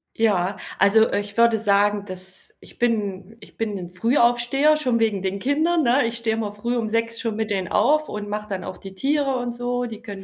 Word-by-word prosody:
Ja, 200 -4 +1 0.2
also, 220 +2 +5
äh, - - 0
ich 205 +2 -10
würde 235 -1 +5
sagen, 205 -1 +2
dass 185 0 -6
ich - - -16
bin 210 -4 -1
ich - - -17
bin 220 -2 -2
'n 175 -1 -7
Frühaufsteher 240 +7 +3
schon 250 -6 +1
wegen 210 -4 0
den 195 +1 -2
Kindern, 310 - +1
ne? 250 0 +3
Ich 230 0 -2
stehe 230 -1 -1
immer 220 -2 -3
früh 235 +4 -3
um 225 -2 -1
6:00 230 +1 -1
schon 230 -3 -2
mit 220 0 -2
denen 190 -3 -1
auf 305 - +2
und 205 0 -5
mache 210 0 -4
dann 190 -3 -4
auch - - -7
die 195 -1 -10
Tiere 275 +4 0
und 240 -1 -3
so. 245 0 -2
Die 230 -1 -8
können 200 -4 -8
225 Hz, 225 wpm, -23 LUFS, 205-240 Hz, 0.2 s, also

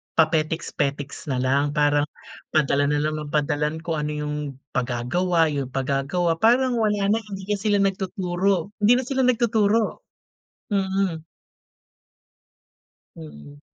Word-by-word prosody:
papetiks-petiks 155 -3 0
na 135 - -1
lang. 140 +3 +1
Parang 145 -1 +3 0.5
padala 145 -1 +3
na 145 0 +1
lang 155 0 -1
ng 150 - -6
padala 150 0 +1
ng 160 +2 -6
kung 160 -2 -2
ano 150 0 -2
'yong 150 0 -3 0.4
pagagawa 155 +8 +1
'yong 140 -3 -2
pagagawa. 140 +6 0
Parang 245 +3 +3
wala 210 -2 +1
na, 225 - +2
hindi 200 -3 -8
na 205 - 0
sila 205 0 +2
nagtuturo. 190 -1 -1
Hindi 215 +4 +5
na 255 - 0
sila 265 0 0
nagtuturo, 225 -3 +1 0.6
mm. 190 -4 0 1.9
Mm. 75 -2 -12
160 Hz, 125 wpm, -23 LUFS, 145-200 Hz, 1.9 s, Hindi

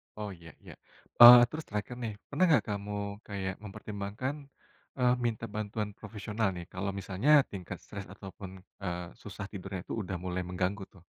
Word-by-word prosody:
Oh, 105 -1 -5
iya 85 -3 -12
iya. - - -11 0.5
Oh, 120 +1 +13
terus 155 0 -6
terakhir, 105 +4 -4
nih. 115 -3 -3 0.2
Pernah 165 +6 +3
nggak 155 - +5
kamu 100 0 -4 0.3
kayak 95 -2 -3
mempertimbangkan, 105 +5 -5 0.6
eee, 125 -1 +4
minta 115 -1 -1
bantuan 105 0 -3
profesional 105 0 -3
nih, 85 -1 -6
kalau 100 +2 -2
misalnya 95 +9 0 0.2
tingkat 95 -3 -6
stres 100 -1 -8
ataupun, 95 -1 -9 0.3
eee, 90 -1 -3
susah 100 0 -7
tidurnya 95 -2 -6
itu - - -5
udah 95 -1 -4
mulai 90 0 -2
mengganggu, 90 +3 -2
tuh? 95 -4 -18
100 Hz, 160 wpm, -31 LUFS, 95-110 Hz, 0.6 s, Oh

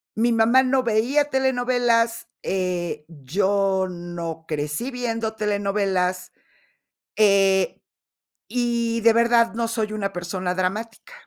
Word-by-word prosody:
Mi 235 +2 +2
mamá 230 +3 +4
no 260 0 +2
veía 250 +6 +1
telenovelas, 245 -3 +1 0.2
eh, 180 -5 -2
yo 190 +6 0
no 170 -2 -6
crecí 150 - -3
viendo 230 -3 -3
telenovelas, 195 -3 -1 0.9
eh, 195 -2 +3 0.7
y 235 -2 -1
de 230 0 +6
verdad 235 0 +3
no 230 0 -1
soy 220 -2 -2
una 205 -2 -3
persona 180 +1 -3
dramática. 210 - -4
215 Hz, 105 wpm, -23 LUFS, 185-235 Hz, 0.9 s, de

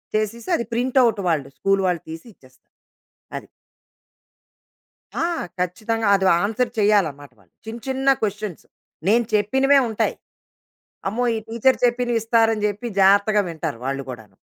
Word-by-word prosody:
చేసిస్తే 215 +2 -2
అది 235 - -3
print 255 +3 -1
out 225 -4 +2
వాళ్ళు 150 -5 0
school 195 0 +1
వాళ్ళు 175 -3 -1
తీసి 160 0 -8
ఇచ్చేస్తారు. 130 -4 -25 0.6
అది. - - -9 1.8
ఆ! - - +2 0.3
ఖచ్చితంగా 220 +5 -2
అది 190 -1 +1 0.2
ఆన్సర్ 230 +3 -1
చేయాలనమాట. 165 -10 +1 0.3
చిన్న, 225 +2 -7
చిన్న 265 +1 -2
క్వెషన్స్. 205 -3 -4 0.4
నేను 235 +2 +3
చెప్పినవే 265 +7 +3
ఉంటాయి. 220 - -1 1.0
"అమ్మో! 245 +4 -1
ఈ - - -2
టీచర్ 235 +3 +2
చెప్పిన్వి 240 -1 +1
ఇస్తారని" 225 -2 +2
జెప్పి 210 +3 -4
జాగ్రత్తగా 200 +2 +4
వింటారు 160 -6 -5
వాళ్ళు 135 0 -2
గూడాను. 110 -4 -11
215 Hz, 130 wpm, -22 LUFS, 180-235 Hz, 1.8 s, జాగ్రత్తగా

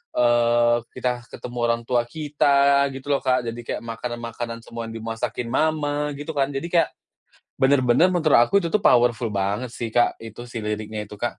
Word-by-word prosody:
eee, 120 0 +3 0.2
kita 125 -1 -2
ketemu 125 0 -8
orang 115 0 +1
tua 120 -1 +2
kita, 140 -1 +2
gitu 135 +2 -5
loh, 140 - +3
Kak, 130 -1 +2
jadi 115 +1 -5
kayak 120 - -5
makanan-makanan 115 0 -5
semua 115 0 -7
yang 115 - -8
dimasakin 115 +1 -4
mama, 150 -1 0
gitu 145 +3 -6
kan, 135 -1 +2
jadi 140 +5 -4
kayak 170 -2 +3 0.7
bener-bener 135 +5 +4
menurut 165 -7 +3
aku 195 +12 +3
itu - - -1
tuh 210 +2 +1
powerful 120 - +3
banget 100 +5 -2
sih, 115 -1 -5
Kak, 120 - +2
itu 115 +1 -9
si 120 - -5
liriknya 105 0 -4
itu, 105 - -11
Kak. 120 +2 -3
120 Hz, 180 wpm, -23 LUFS, 115-140 Hz, 0.7 s, bener-bener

